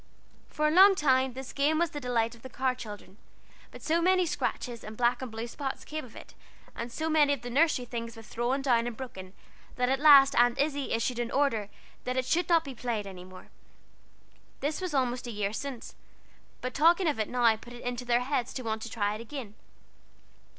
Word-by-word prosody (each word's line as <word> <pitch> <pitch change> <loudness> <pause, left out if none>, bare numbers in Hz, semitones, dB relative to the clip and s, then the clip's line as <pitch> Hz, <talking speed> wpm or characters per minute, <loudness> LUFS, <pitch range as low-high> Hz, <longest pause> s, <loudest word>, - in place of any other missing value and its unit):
For 305 0 0
a - - +2
long 385 +4 +8
time 265 -5 +2
this 265 +1 -8
game 290 +3 +2
was 340 0 +1
the 295 - -5
delight 235 -3 0
of 235 - -16
the 260 - -9
Carr 260 +1 0
children; 210 -5 -10 0.5
but - - -13
so 330 +2 +1
many 365 +1 +3
scratches 245 -7 -3
and 215 0 -9
black 245 +1 +2
and 260 - -5
blue 225 +1 -5
spots 270 +3 -5
came 310 0 -5
of 240 -3 -14
it, - - -12 0.4
and 235 +1 -5
so 315 +6 -3
many 300 -2 +4
of 265 -4 -5
the 245 - -6
nursery 280 -2 +2
things 230 -1 -6
were 225 - -11
thrown 240 +5 -2
down 240 -3 +2
and 235 -2 -6
broken, 190 -8 -8 0.4
that 250 0 +1
at 270 0 +1
last 280 -2 +8
Aunt 240 0 +4
Izzie 285 -1 -1
issued 230 +1 -1
an 240 -1 -2
order 235 -8 0 0.4
that 255 +1 -2
it 260 - +1
should 340 +8 0
not 335 -2 +4
be 275 -3 -7
played 230 -4 -3
any 185 -2 -9
more. 185 0 -13 1.1
This 295 +5 -2
was 365 -5 -3
almost 250 -2 0
a - - -4
year 205 -1 -2
since; 260 0 -6 0.7
but 255 0 -4
talking 335 +4 +4
of 290 -7 0
it 215 - -1
now 240 -3 +3
put 240 +2 -13
it 240 - -10
into 245 0 -3
their 240 0 +2
heads 255 -1 -2
to 255 - -4
want 220 -1 -3
to 230 - -6
try 205 -2 -1
it 215 - -6
again. 235 -3 -7
250 Hz, 220 wpm, -29 LUFS, 230-285 Hz, 1.1 s, long